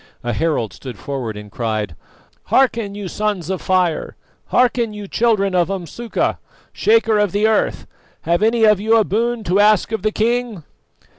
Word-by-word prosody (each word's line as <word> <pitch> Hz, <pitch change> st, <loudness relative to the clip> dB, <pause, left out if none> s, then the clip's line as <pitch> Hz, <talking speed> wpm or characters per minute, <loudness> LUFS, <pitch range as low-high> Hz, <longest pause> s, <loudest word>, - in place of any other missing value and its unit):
A 120 Hz, 0 st, -2 dB
herald 135 Hz, -, -1 dB
stood 125 Hz, -5 st, -9 dB
forward 125 Hz, -6 st, -5 dB
and 105 Hz, -1 st, -10 dB
cried: 110 Hz, -7 st, -3 dB, 0.5 s
"Hearken, 230 Hz, -6 st, +1 dB
you 205 Hz, -2 st, -5 dB
Sons 195 Hz, -3 st, -2 dB
of 190 Hz, -, -3 dB
Fire! 180 Hz, -3 st, 0 dB, 0.3 s
Hearken, 240 Hz, -3 st, +2 dB
you 210 Hz, -1 st, -7 dB
Children 205 Hz, -3 st, +1 dB
of 175 Hz, -1 st, +2 dB
Umsuka, 195 Hz, +5 st, -3 dB, 0.3 s
Shaker 425 Hz, -, +3 dB
of 205 Hz, -3 st, +1 dB
the 205 Hz, +1 st, +2 dB
Earth! 220 Hz, -1 st, +1 dB, 0.4 s
Have 170 Hz, +3 st, 0 dB
any 225 Hz, +1 st, +2 dB
of 210 Hz, -3 st, +5 dB
you 220 Hz, +2 st, +3 dB
a 220 Hz, -, +4 dB
boon 230 Hz, +3 st, -1 dB
to 185 Hz, +1 st, +1 dB
ask 210 Hz, 0 st, +4 dB
of 220 Hz, -, -2 dB
the 215 Hz, +1 st, 0 dB
king?" 230 Hz, -4 st, -1 dB
205 Hz, 165 wpm, -19 LUFS, 170-225 Hz, 0.5 s, of